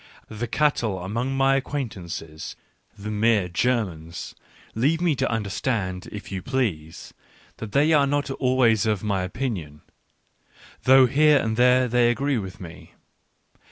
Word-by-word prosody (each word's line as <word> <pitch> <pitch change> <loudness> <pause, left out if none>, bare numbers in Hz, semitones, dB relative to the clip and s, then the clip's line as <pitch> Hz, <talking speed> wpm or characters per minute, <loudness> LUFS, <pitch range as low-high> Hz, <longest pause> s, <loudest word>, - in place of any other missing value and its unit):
^ 110 - -9
The 120 - -2
cattle 120 -10 0
among 120 +8 -2
my 135 0 +3
acquaintances, 95 - -5 0.4
the 105 +1 -6
mere 105 -2 +2
Germans, 90 -6 -2 0.4
leave 145 +9 +1
me 170 -4 +1
to - - 0
understand, 100 -3 -2
if 105 -1 -8
you 95 -1 -4
please, 95 - -3 0.4
that 110 -2 -7
they 150 +3 +4
are 145 -2 +4
not 145 0 -1
always 125 -5 +2
of 105 -4 0
my 100 -3 0
opinion, 90 - -4 1.0
though 130 0 +7
here 150 +4 +4
and 110 -4 -1
there 125 +1 +4
they 120 0 +3
agree 135 +1 0
with 95 -2 -8
me. 85 -2 -12
115 Hz, 140 wpm, -24 LUFS, 95-135 Hz, 1.0 s, though